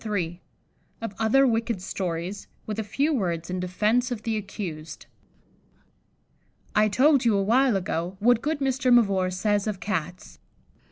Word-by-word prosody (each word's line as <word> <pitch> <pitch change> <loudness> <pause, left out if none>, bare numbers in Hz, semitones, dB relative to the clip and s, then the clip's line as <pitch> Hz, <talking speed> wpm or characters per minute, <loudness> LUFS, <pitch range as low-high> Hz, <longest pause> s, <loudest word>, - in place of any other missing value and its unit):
] - - -41
Of 225 -3 -4
other 225 +5 +4
Wicked 230 -3 0
Stories, 180 +1 -4 0.2
with 215 0 -4
a - - -1
few 275 +10 0
Words 175 - -2
in 185 - -2
Defence 210 +7 +1
of 235 -4 -5
the 225 -1 -1
Accused. 180 -7 -6 1.7
I 215 0 +5
told 275 +5 +4
you 225 -4 +3
awhile 235 +5 +3
ago 180 0 -2
what 235 +2 +3
good 300 -1 -2
Mr. 265 -1 +1
Mavor 200 -6 +4
says 205 +3 0
of 205 -3 -3
Cats. 180 -3 -4
210 Hz, 145 wpm, -25 LUFS, 185-240 Hz, 1.7 s, I